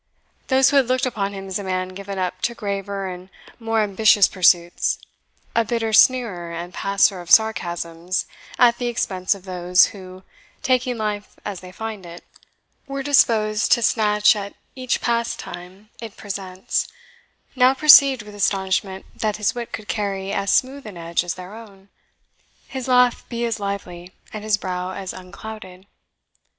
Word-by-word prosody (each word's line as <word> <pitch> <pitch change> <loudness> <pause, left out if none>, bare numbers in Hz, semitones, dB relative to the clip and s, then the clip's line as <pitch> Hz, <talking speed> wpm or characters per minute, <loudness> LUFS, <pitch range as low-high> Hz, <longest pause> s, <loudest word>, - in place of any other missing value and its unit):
Those 265 0 +4
who 285 - +3
had 265 -3 +4
looked 255 +1 +1
upon 200 -5 -2
him 195 -1 -7
as 190 +1 -3
a - - -6
man 185 -1 -2
given 195 +1 -7
up 185 0 -3
to 235 - -1
graver 200 -2 -4
and 180 0 -8 0.3
more 225 -1 0
ambitious 210 0 +4
pursuits, 175 -2 +2 0.6
a 230 - +3
bitter 225 0 -2
sneerer 210 -9 +3
and 170 +2 -7
passer 195 -1 +1
of 175 - -12
sarcasms 175 -5 +1 0.3
at 240 -1 +4
the 245 - -2
expense 195 -5 -1
of 195 -1 -14
those 180 0 +3
who, 185 -2 -11 0.4
taking 255 -1 +1
life 210 -1 -4
as 200 -3 -5
they 185 0 -12
find 220 0 -6
it, 170 +1 -11 0.6
were 275 0 -4
disposed 225 -6 +2
to 235 - +1
snatch 210 -1 +3
at 200 -1 -6 0.2
each 255 -2 -2
pastime 210 -4 -4
it 225 -3 -9
presents, 190 -2 -3 0.7
now 255 +1 +4
perceived 275 -4 +7
with 210 0 -12
astonishment 190 -1 -1
that 215 -2 -2
his 210 -1 0
wit 240 -1 -6
could 215 -2 -7
carry 195 -2 -3
as 200 0 0
smooth 270 -1 0
an 200 -4 -9
edge 170 +1 -1
as 175 -1 -4
their 185 +2 -10
own, 200 -3 -14 0.8
his 260 -2 -6
laugh 250 -1 +3
be 235 -1 -2
as 230 -1 -2
lively, 190 -3 -6 0.2
and 215 -1 -6
his 215 -1 +1
brow 185 -1 -4
as 190 -1 -6
unclouded. 185 0 -10
200 Hz, 160 wpm, -21 LUFS, 185-230 Hz, 0.8 s, perceived